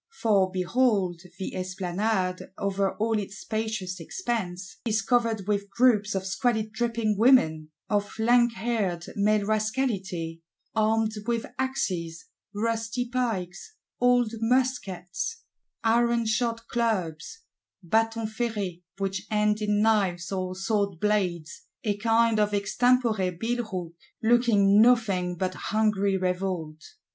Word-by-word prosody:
For, 200 -5 +3
behold, 185 -2 +1 0.2
the 190 - -5
Esplanade, 185 +1 -2
over 195 0 -1
all 220 0 0
its 200 0 -6
spacious 215 -2 -3
expanse, 190 - -4
is 220 -2 +1
covered 230 -4 +1
with 200 -1 -1
groups 215 -5 +3
of 190 0 -2
squalid 220 +2 0
dripping 225 -3 0
Women; 160 -11 +4 0.2
of 205 0 -1
lankhaired 225 -6 +1
male 210 0 +2
Rascality, 210 -7 -1 0.3
armed 220 0 +2 0.2
with 235 -1 0
axes, 180 -11 -2 0.3
rusty 230 +3 -2
pikes, 235 - -3 0.2
old 245 -2 +3
muskets, 245 - -1 0.4
ironshod 230 0 +1
clubs 220 - -2 0.4
(batons 225 +3 0
ferrés, 205 -7 -2 0.2
which 195 0 -3
end 210 0 +1
in 210 0 +1
knives 195 -5 +1
or 185 -1 -2
sword 200 -2 -1
blades, 180 -6 -1 0.2
a 210 -2 0
kind 225 +1 +3
of 210 -1 +2
extempore 215 -3 +1
billhook);—looking 215 0 +1
nothing 205 -7 +3
but 185 +1 -2
hungry 200 -2 +1
revolt. 180 -4 -2
210 Hz, 105 wpm, -27 LUFS, 185-230 Hz, 0.4 s, Women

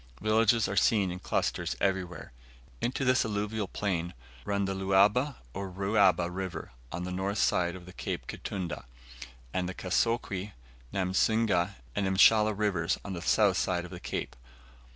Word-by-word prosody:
Villages 110 +1 +3
are 100 - -3
seen 100 -1 +3
in 90 - -6
clusters - - -1
everywhere. 90 -7 -2 0.5
Into 130 +2 -1
this 130 0 +4
alluvial 105 -1 -2
plain 90 -6 -2 0.3
run 100 -1 0
the 95 - -1
Luaba, 100 +8 +3 0.2
or 100 -1 -4
Ruaba 95 -1 +3
River, 95 +1 -5 0.2
on 85 +1 -4
the 90 - -4
north 95 +3 -2
side 85 -3 +2
of 90 0 -11
Cape - - -4
Kitunda, 90 -10 -5 0.7
and 90 -1 -1
the 95 - -6
Kasokwe, 100 0 -1 0.4
Namusinga, 95 0 +1 0.2
and 100 - 0
Mshala 105 +2 +5
Rivers, 95 -5 +1
on 100 - -4
the 85 - -5
south 100 0 +3
side 90 -1 0
of 90 - -11
the 90 - -7
cape. 90 - -4
95 Hz, 150 wpm, -29 LUFS, 90-105 Hz, 0.7 s, Mshala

